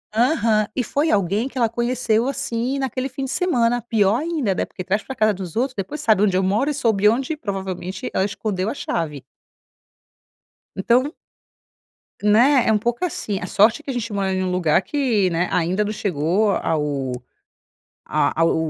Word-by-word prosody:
Aham. 225 -4 +2
E 255 - 0
foi 290 +7 0
alguém 200 +5 +1
que - - -11
ela 235 -2 +3
conheceu, 235 0 0
assim, 250 -1 -2
naquele 265 0 -2
fim 265 +2 -5
de 265 - -4
semana. 245 -9 +1
Pior 220 -2 +2
ainda, 300 - -1
né? - - -1
Porque 185 - -7
traz 195 +4 0
para 265 - -7
casa 215 -2 +3
dos 185 -2 -7
outros 255 +3 0
depois 205 +10 -5
sabe 220 -8 +3
onde 195 -3 +3
eu 190 - +1
moro 210 +9 +1
e 295 - 0
soube 215 -6 +3
onde, 265 +7 -1
provavelmente, 190 - -5
ela 190 - +1
escondeu 205 -1 -2
a - - -2
chave. 150 - -3 1.5
Então 250 - +2 1.1
Né? 240 +6 +4
É - - +4
um 215 - +4
pouco 235 - -2
assim 210 - -3
a 185 - -5
sorte 220 +7 +3
que - - -9
a 270 - -1
gente 230 -2 -3
mora 195 -1 0
em 185 0 -1
lugar 180 -2 +2
que, 235 -10 +1
né, 175 +2 0
ainda 180 +4 +1
não 210 - -3
chegou 190 +2 0
ao 145 -7 -1 0.9
a 165 - 0
ao 165 - +3
215 Hz, 180 wpm, -21 LUFS, 190-250 Hz, 1.5 s, Né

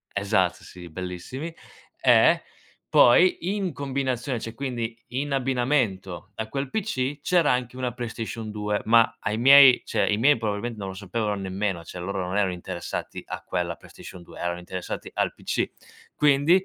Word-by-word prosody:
Esatto, 100 -3 +1
sì, 90 -1 -11
bellissimi. 95 - -6 0.5
Eh, - - +5 0.5
poi, 180 +8 +5
in 195 -4 -2
combinazione 135 -2 -2
cioè 115 +1 -6
quindi, 120 -3 -4
in 135 +4 -3
abbinamento 120 -8 -1
a 110 0 -4
quel 135 +1 -3
PC 145 -10 -2
c'era 170 -3 +3
anche 125 0 -2
una 125 -2 -2
PlayStation 115 -2 -5
2. 105 0 -2
Ma 115 +1 +4
ai 105 - -1
miei, 135 0 +8
cioè, - - 0
i 105 - +2
miei 145 +6 +5
probabilmen 110 +2 -2
non 100 -2 -5
lo 95 - -6
sapevano 105 +2 -2
nemmeno. 95 -2 -3
Cioè, 90 - -9
loro 95 0 -3
non 95 - -3
erano 100 -3 +2
interessati 90 0 -5
a - - -6
quella 85 -2 -2
PlayStation 90 - -12
2 - - -13
erano 85 0 -2
interessati 90 0 -6
al - - 0
PC. - - -2 0.4
Quindi, 150 +6 +4
115 Hz, 160 wpm, -25 LUFS, 95-135 Hz, 0.5 s, miei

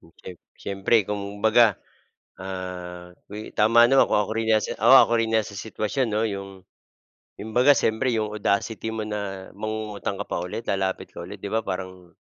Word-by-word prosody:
Hmm, 80 - -21
siyem 90 -2 -10 0.2
siyempre 100 +3 0
kung 100 0 -6
baga, 110 -1 +5 0.7
ah, 90 -2 -7 0.2
wi 105 +1 -8
tama 115 +2 +5
naman 135 +2 +4
kung - - +2
ako 105 - -5
rin 110 0 -2
'yan 110 -1 +3
si - - -3
oo, - - +6
ako - - +6
rin 110 0 -1
'yan 110 - +2
sa 100 0 -10
sitwasyon 110 +5 -2
'no, 105 0 0
yung 100 -3 -4 0.9
yung 110 +1 -8
baga 125 +4 +5
siyempre, 125 -1 +2
yung 110 -2 -2
audacity 105 +2 -1
mo 110 -1 -4
na 100 -3 -5
mangungutang 105 -1 -4
ka 100 - -4
pa 85 - -3
ulit, 110 +6 -6
lalapit 95 -1 -2
ka - - -7
ulit, 95 +4 -9
'di 100 - -7
ba 110 +2 -1
parang 95 -2 -6
105 Hz, 190 wpm, -24 LUFS, 95-110 Hz, 0.9 s, oo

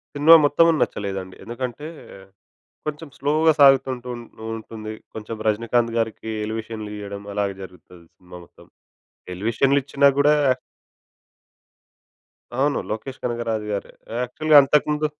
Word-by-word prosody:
Cinema 150 +3 +8
మొత్తం 145 +3 +4 0.2
నచ్చలేదండి. 95 -2 -3
ఎందుకంటే 125 +6 -5 1.0
కొంచెం 150 +2 -5
స్లోగా 155 +3 +3
సాగుతూ 135 -1 +6
ఉంటూ 125 0 -10 0.5
ఉంటుంది. 110 -1 -8 0.2
కొంచెం 110 +1 -6
'రజనీకాంత్' 115 +2 +1
గారికి 110 0 -2 0.2
ఎలివేషన్‌లియ్యడం 105 -2 -6
అలాగే 100 -1 -1
జరుగుతది 90 -1 -14
సినిమా 90 0 -13
మొత్తం - - -20 0.7
ఎలివేషన్లు 115 +8 +1
ఇచ్చినా 140 +1 +2
కూడా 145 +1 +5 2.2
అవును. 140 +4 +1
'లోకేష్ 110 +5 -5
కనకరాజు' 115 -3 -2
గారే. 100 - -4 0.3
యాక్చువల్‌గా 150 +5 +2
అంతకుముందు 150 +2 +1
115 Hz, 105 wpm, -22 LUFS, 105-140 Hz, 2.2 s, సినిమా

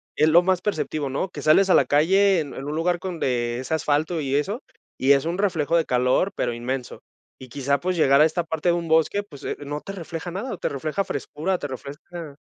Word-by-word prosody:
es 155 - +3
lo 170 +3 +6
más 185 0 +1
perceptivo, 155 -8 -2
¿no?, 140 +8 -2
que - - -8
sales 190 +6 +4
a - - +6
la - - +5
calle 190 +6 +4
en 145 -3 -7
en 135 - -7
un 150 +1 -3
lugar 175 +2 0
con 180 -3 -5
de 120 -3 -1
ese 130 +5 -4
asfalto 160 +2 0
y 135 -1 -1
eso, 200 - -1 0.4
y 135 +2 +5
es 140 -1 +2
un 170 +2 -2
reflejo 170 -6 0
de 165 - +1
calor, 125 +9 +2
pero 120 - -1
inmenso. 125 +2 -5 0.4
Y 130 - -10
quizá, 140 +3 0
pues, 185 +4 -1
llegar 140 -3 +5
a - - +8
esta 165 +2 0
parte 160 +1 -1
de - - +4
un 170 -1 -2
bosque, 160 +6 +2
pues, 150 -9 -14
eh, - - -2
no 145 +1 -4
te 195 - -7
refleja 170 -2 -6
nada, 205 +9 -4
te - - -2
refleja 155 +7 -2
frescura, 160 +6 -2
te 145 - -5
refresca 145 +3 -8
155 Hz, 235 wpm, -24 LUFS, 140-180 Hz, 0.4 s, a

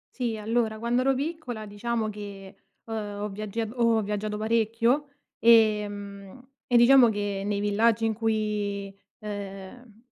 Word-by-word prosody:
Sì. 240 -3 -2
Allora 220 0 -1
quando 235 +2 +1
ero 270 +1 +3
piccola 270 -6 -4
diciamo 220 +2 -2
che, 200 -2 -9 0.3
ehm, 210 -2 -5
ho 210 - -2
viaggia 210 +2 -4
ehm, 220 +1 -6
ho 230 -2 +3
viaggiato 210 +1 -3
parecchio, 230 +5 +1 0.3
ehm, 210 0 +2 0.2
e 245 - +4
diciamo 245 0 +7
che 205 -2 -2
nei 205 0 -1
villaggi 215 +2 +2
in 225 - +1
cui, 210 -3 -2 0.3
ehm, 205 +2 -8
215 Hz, 135 wpm, -26 LUFS, 205-235 Hz, 0.3 s, diciamo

